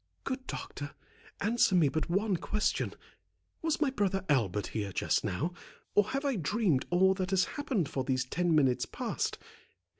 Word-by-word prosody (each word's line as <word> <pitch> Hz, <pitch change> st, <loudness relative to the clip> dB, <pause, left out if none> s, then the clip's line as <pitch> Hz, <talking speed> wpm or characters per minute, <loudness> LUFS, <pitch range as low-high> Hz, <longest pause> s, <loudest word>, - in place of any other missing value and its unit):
"Good 260 Hz, -1 st, -4 dB
doctor, 145 Hz, 0 st, -6 dB, 0.5 s
answer 220 Hz, -1 st, +3 dB
me 165 Hz, -5 st, +5 dB
but 155 Hz, +5 st, -1 dB
one 195 Hz, +3 st, +2 dB
question. 210 Hz, +5 st, -1 dB, 0.7 s
Was 320 Hz, -1 st, 0 dB
my 295 Hz, -3 st, +2 dB
brother 195 Hz, -5 st, 0 dB
Albert 105 Hz, -8 st, +2 dB
here 100 Hz, -3 st, -2 dB
just -, -, +1 dB
now, 155 Hz, -, -1 dB, 0.4 s
or 205 Hz, -, +5 dB
have 275 Hz, +2 st, -2 dB
I 275 Hz, -5 st, +1 dB
dreamed 180 Hz, -, +1 dB
all 190 Hz, +2 st, +5 dB
that 185 Hz, -1 st, -2 dB
has 185 Hz, -1 st, +3 dB
happened 250 Hz, -, -1 dB
for 135 Hz, -, -2 dB
these 130 Hz, -1 st, 0 dB
ten 175 Hz, +4 st, +1 dB
minutes 135 Hz, -5 st, +3 dB
past? -, -, -2 dB
180 Hz, 160 wpm, -31 LUFS, 145-215 Hz, 0.7 s, me